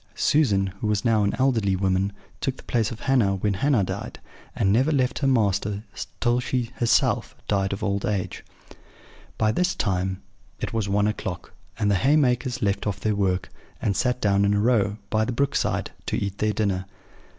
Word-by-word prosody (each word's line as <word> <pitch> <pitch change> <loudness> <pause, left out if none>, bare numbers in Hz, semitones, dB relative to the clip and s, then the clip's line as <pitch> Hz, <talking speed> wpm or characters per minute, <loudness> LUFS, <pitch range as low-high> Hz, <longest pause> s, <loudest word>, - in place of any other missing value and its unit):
Susan, 105 -11 +3 0.2
who - - -1
was 105 0 0
now 110 -3 +3
an 100 - 0
elderly 115 -8 +2
woman, 95 +1 +1 0.3
took 135 -1 -2
the - - -13
place 115 -3 0
of 115 - -8
Hannah 120 -8 +2
when 100 +2 0
Hannah 120 +2 +2
died, - - -5 0.4
and 95 0 +2
never 130 +7 +3
left 130 -3 +1
her 140 - +1
master 105 -4 +1 0.4
till 120 0 +2
she 125 -1 -2
herself 120 - +2
died 95 -1 +1
of 100 +2 -4
old 100 -1 0
age." 100 -4 -2 0.9
By 110 -1 +2
this 180 +9 +1
time 95 - -1 0.4
it - - -4
was 110 -3 -1
one 100 +1 +2
o'clock; 95 -4 -4 0.2
and 105 -3 +1
the 95 - +1
haymakers 130 -3 +2
left 100 +1 0
off 100 -1 -2
their 110 +1 0
work, 95 -2 0 0.3
and 100 - 0
sat 125 +3 +1
down 100 -2 +2
in 100 0 +3
a - - +2
row, 105 -2 +2
by 110 0 +2
the 110 - -1
brook 140 +3 0
side, - - 0 0.2
to - - 0
eat 100 0 -3
their 105 0 +1
dinner. 95 -3 -1
105 Hz, 190 wpm, -25 LUFS, 100-125 Hz, 0.9 s, Susan